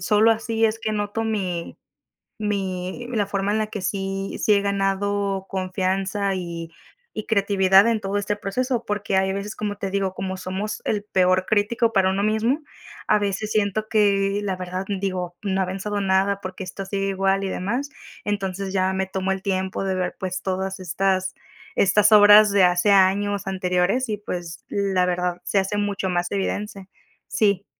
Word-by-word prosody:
solo 210 +4 +4
así 225 0 0
es 225 0 +1
que 220 -1 -2
noto 210 +1 -2
mi 185 -6 -3 0.6
mi 195 0 -3
la 210 -3 +1
forma 200 0 -1
en 220 - +1
la 215 - 0
que 205 -3 -6
sí 195 0 -3
sí 210 - +4
he 200 - +2
ganado 200 0 0
confianza 190 +1 -1
y 170 -2 -5 0.4
y 215 - -5
creatividad 195 -1 +4
en 230 -2 +1
todo 195 0 -2
este 205 0 -1
proceso. 240 +4 -2
Porque 205 -2 0
hay 190 0 +1
veces, 200 +1 -4
como 205 -1 -3
te 195 -1 -4
digo, 195 -1 -1
como 190 0 -4
somos 190 +3 -4
el 205 -1 -1
peor 185 -2 +2
crítico 220 +3 +1
para 190 -2 +3
uno 195 +1 0
mismo 220 +7 +1 0.5
a - - +4
veces 205 +1 -2
siento 215 0 0
que, 200 -2 +2
la 195 -2 -2
verdad, 185 +1 -4
digo: 185 -3 -3
"No 195 -2 0
ha - - +2
avanzado 195 +3 -3
nada, 195 +1 +2
¿por 185 -1 -6
qué 190 - -6
esto 190 +2 -7
sigue 195 0 -2
igual?". 195 0 +1
Y 190 - -2
demás. 245 +12 -2 0.3
Entonces, 195 -1 -2
ya 185 -1 +1
me 190 0 0
tomo 190 0 -2
el 190 - -4
tiempo 190 0 -2
de 190 - 0
ver, 180 -1 -2
pues, 185 -1 -3
todas 190 0 -3
estas 185 +1 0 0.4
estas 210 +2 +4
obras 210 0 +8
de 200 -2 +4
hace 180 +3 +3
años 200 +1 +3
anteriores. 190 +6 0
Y, 210 - -1
pues, 175 -5 -6
la 195 -2 +1
verdad, 180 0 -1
se 200 - +1
hace 195 +2 0
mucho 205 -2 -1
más 175 0 -1
evidente. 200 0 -3 0.4
Sí. 200 -2 +1
195 Hz, 180 wpm, -23 LUFS, 190-205 Hz, 0.6 s, obras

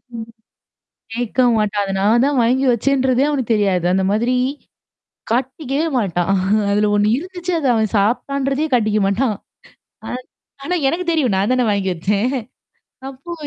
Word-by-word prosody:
ம். 225 0 -7 0.9
கேட்க 245 +1 -2 0.2
மாட்டான். 210 -1 0
அத 195 - -4
நான் 220 +5 +3
தான் 285 -2 0
வாங்கி 255 +4 +2
வச்சேன்றதே 260 +2 +1
அவனுக்கு 260 -6 -1
தெரியாது. 195 -4 +1
அந்த 190 0 +1
மாதிரி, 235 +4 +1 1.0
காட்டிக்கவே 270 +5 -1
மாட்டான். 180 -2 -1 0.4
அதுல 210 +1 +2
ஒண்ணு 205 +1 +2
இருந்துச்சு 360 +2 -5
அத 280 - -1
அவன் 220 -1 +1
சாபிட்டான்றதையே 275 +7 0
காட்டிக்க 215 -3 +1
மாட்டான். 215 +2 0 0.7
ஆ - - -5 0.6
ஆனா, 360 - -1
எனக்கு 345 +5 -1
தெரியும். 280 -10 +1
நான் 200 +5 +1
தானே 255 -1 +2
வாங்கி 200 -2 0
வச்சேன். 200 +7 0 0.8
அப்போ 275 +6 -9
240 Hz, 140 wpm, -19 LUFS, 205-275 Hz, 1.0 s, நான்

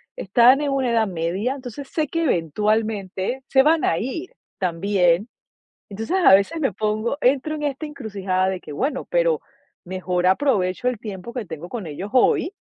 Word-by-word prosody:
están 240 +7 +4
en 285 -2 -1
una 265 -3 0
edad 225 -2 +2
media, 185 +8 -2
entonces 265 +1 -8
sé 310 -2 -1
que 330 +3 -1
eventualmente 210 - -1
se 265 - +5
van 320 +1 +3
a 165 - +2
ir 320 - -4 0.3
también. 180 +2 +1 0.6
Entonces, 225 - -2
a 265 - +7
veces 200 +12 0
me 270 -7 +1
pongo 215 +6 -1
entro 280 +4 +2
en 300 - -5
esta 290 +2 -2
encrucijada 200 -9 -2
de 190 -1 -3
que: 150 - -9
"Bueno, 270 - -2
pero - - +2 0.4
mejor 180 0 -1
aprovecho 190 0 +1
el 250 -4 -1
tiempo 205 +1 -7
que 245 -4 -3
tengo 165 0 -8
con 210 -5 -6
ellos 185 +8 -6
hoy 300 +7 +3
220 Hz, 170 wpm, -22 LUFS, 185-275 Hz, 0.6 s, a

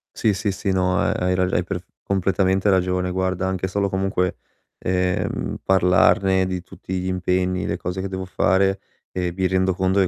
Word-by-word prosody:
Sì, 110 - +2
sì, 100 +1 -1
sì, 100 +1 -2
no, 90 -1 +1
ehm, - - +1
hai 90 0 +2
rag 90 0 0
hai 90 - +2
perf 90 0 -5 0.2
completamente 95 0 +1
ragione. 90 -1 +1
Guarda, 95 0 -1
anche 95 0 -2
solo 100 +1 0
comunque, 95 -1 -1 0.4
ehm, 90 0 -1
parlarne 95 0 +4
di 90 -1 -3
tutti 90 +1 -6
gli 90 - -3
impegni, 90 0 0
le - - -2
cose 90 +2 -4
che 95 - -4
devo 95 0 -4
fare, 95 +1 +2 0.3
ehm, 90 -2 -2
mi 95 +1 0
rendo 95 0 +1
conto 95 +1 +2
che 95 - +3
95 Hz, 185 wpm, -22 LUFS, 90-95 Hz, 0.4 s, parlarne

